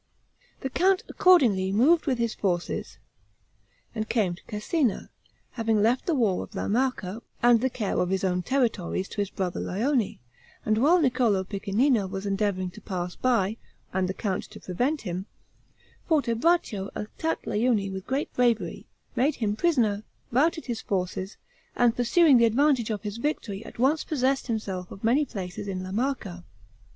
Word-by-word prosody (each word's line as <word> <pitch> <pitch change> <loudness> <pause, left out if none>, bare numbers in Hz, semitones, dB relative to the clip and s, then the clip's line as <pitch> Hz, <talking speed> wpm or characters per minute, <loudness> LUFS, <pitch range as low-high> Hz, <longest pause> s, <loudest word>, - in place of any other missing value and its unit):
The 265 - -2
count 380 +4 +3
accordingly 235 - +4
moved 295 +12 +4
with 260 -3 +1
his 235 -1 0
forces, 180 -3 -2 1.0
and 220 -1 -3
came 205 -7 +1
to 175 - -12
Cesena, 225 - -1 0.4
having 225 -2 0
left 230 +5 +2
the 335 - +2
war 215 -8 +2
of - - -13
La - - -2
Marca 230 -3 -1 0.2
and 240 -2 +6
the 260 - +2
care 220 -5 -2
of 180 - +1
his 190 0 -1
own 180 -1 +1
territories 220 -6 0
to - - -10
his 200 - -2
brother 185 -3 -3
Lione; 235 +3 0 0.5
and 215 0 +2
while 325 +8 +5
Niccolo 250 - +2
Piccinino 205 +3 +1
was 195 +1 -5
endeavoring 195 -2 -1
to 215 - -13
pass 180 -2 -4
by, 225 -4 +1 0.4
and 185 0 0
the 190 - -3
count 195 -4 -2
to 215 0 -12
prevent 250 - -1
him, 185 0 -4 0.8
Fortebraccio 240 - +1
attacked 320 +10 -3
Lione 210 -3 +1
with 190 -1 -7
great 270 +3 -2
bravery, 240 -3 0 0.3
made 275 +3 +2
him 210 -3 -1
prisoner, 230 -9 +2 0.3
routed 315 +6 +2
his 235 -3 -3
forces, 185 0 -3 0.4
and 240 -1 +3
pursuing 265 +4 +5
the 235 - +6
advantage 250 0 +2
of 215 -1 -3
his 210 +1 -4
victory, 230 -6 -3
at - - -11
once 275 +6 +2
possessed 270 -2 0
himself 195 -6 -3
of 195 - -11
many 255 +7 +3
places 195 -4 -6
in 185 -2 -3
La 185 - -6
Marca. 210 -6 -2
220 Hz, 160 wpm, -26 LUFS, 195-260 Hz, 1.0 s, and